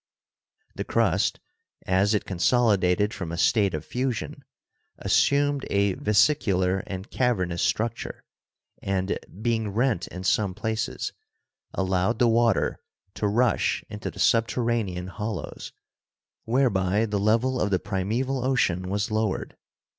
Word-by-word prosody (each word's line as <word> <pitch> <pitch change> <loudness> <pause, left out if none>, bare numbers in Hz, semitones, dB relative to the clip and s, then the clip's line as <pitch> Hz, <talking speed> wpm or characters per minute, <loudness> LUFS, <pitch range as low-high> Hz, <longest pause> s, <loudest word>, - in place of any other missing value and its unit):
The - - -4
crust, - - +1 0.5
as 100 +3 +2
it 105 - -1
consolidated 100 0 +2
from 85 -4 -5
a 85 - -4
state 100 0 +3
of 75 - -5
fusion, 125 -3 -3 0.5
assumed 145 -1 +2
a 100 -1 +2
vesicular 100 -4 +2
and 95 +1 -6
cavernous 95 -9 0
structure, 115 +1 -2 0.6
and 95 0 -1 0.2
being 110 -3 0
rent 110 -3 0
in 90 +1 -8
some 100 -1 +1
places, 110 0 -3 0.6
allowed 95 +3 +1
the 120 - +4
water 115 -2 +2 0.3
to 105 - -1
rush 115 +2 +1
into 105 +1 -5
the - - -12
subterranean 115 -5 +1
hollows, 95 +1 -5 0.7
whereby 110 -5 +2
the 105 -2 -1
level 115 +5 +2
of 105 - +1
the 95 - +2
prime 95 0 -3
val 130 +3 -1
ocean 95 -9 +1
was 100 +2 -1
lowered. 110 -2 -1
105 Hz, 125 wpm, -26 LUFS, 95-120 Hz, 0.7 s, the